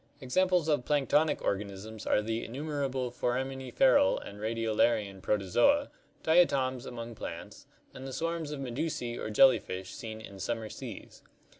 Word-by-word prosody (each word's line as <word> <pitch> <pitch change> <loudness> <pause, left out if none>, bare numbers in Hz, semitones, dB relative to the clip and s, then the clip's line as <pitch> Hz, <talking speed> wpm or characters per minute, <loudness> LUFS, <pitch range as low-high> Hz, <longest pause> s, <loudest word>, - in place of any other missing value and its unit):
Examples 180 +5 +2
of 150 -5 +2
planktonic 150 +2 +2
organisms 100 +2 -4
are 105 - +3
the 115 +1 -2
innumerable 135 -1 -3
forami 130 +2 -1 0.2
niferal 280 +1 +4
and 100 - -10
radiolarian 110 -2 0
Protozoa, 280 - +2 0.3
diatoms 135 -7 +3
among 115 -1 -6
plants, 85 -6 -8 0.3
and 130 +1 -8
the - - -6
swarms 165 +2 -2
of 150 -1 -5
medusae 125 -2 -3
or - - -4
jellyfish 105 -5 +3
seen 110 -1 -7
in 100 -3 -10
summer 110 +2 -3
seas. - - -9
125 Hz, 135 wpm, -30 LUFS, 110-150 Hz, 0.3 s, niferal